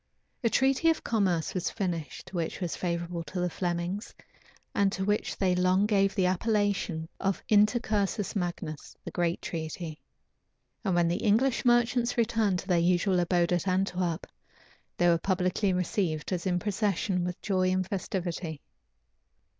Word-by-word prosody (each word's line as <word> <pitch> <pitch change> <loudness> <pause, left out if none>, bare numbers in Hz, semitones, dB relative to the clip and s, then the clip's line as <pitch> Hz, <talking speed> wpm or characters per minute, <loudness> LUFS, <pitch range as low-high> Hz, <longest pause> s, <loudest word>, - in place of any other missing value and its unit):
A 230 - +3
treaty 270 +7 +3
of 325 - +1
commerce 190 -8 +1
was 185 -1 -1
finished, 175 - -4
which 170 -3 -2
was 175 -4 -2
favorable 170 -1 -3
to 185 - -5
the 180 -1 0
Flemings, 175 +4 -3 0.6
and 200 -1 +2
to 190 0 -2
which 205 +1 0
they 185 -2 +2
long 185 +2 +3
gave 195 -2 +2
the 190 -3 +2
appellation 195 -4 0
of 195 -1 -1
"intercursus 210 -2 +2
magnus," 175 -5 -4
the - - -5
great 175 -1 -1
treaty. 160 -1 -5 0.8
And 190 -5 +1
when 175 -1 +3
the 170 - +1
English 235 +5 +2
merchants 240 0 +3
returned 225 -4 +2
to 180 - -7
their 180 -3 +3
usual 180 +2 +2
abode 175 0 +2
at 175 +2 0
Antwerp, 185 -2 0 0.7
they 175 - +3
were 170 -1 +4
publicly 185 +2 +1
received, 180 -3 -1
as 180 +1 -2
in 180 -1 +2
procession, 195 -2 0
with 180 +1 -3
joy 185 -2 +1
and 185 0 +1
festivity. 175 -5 -3
185 Hz, 150 wpm, -29 LUFS, 175-205 Hz, 0.8 s, were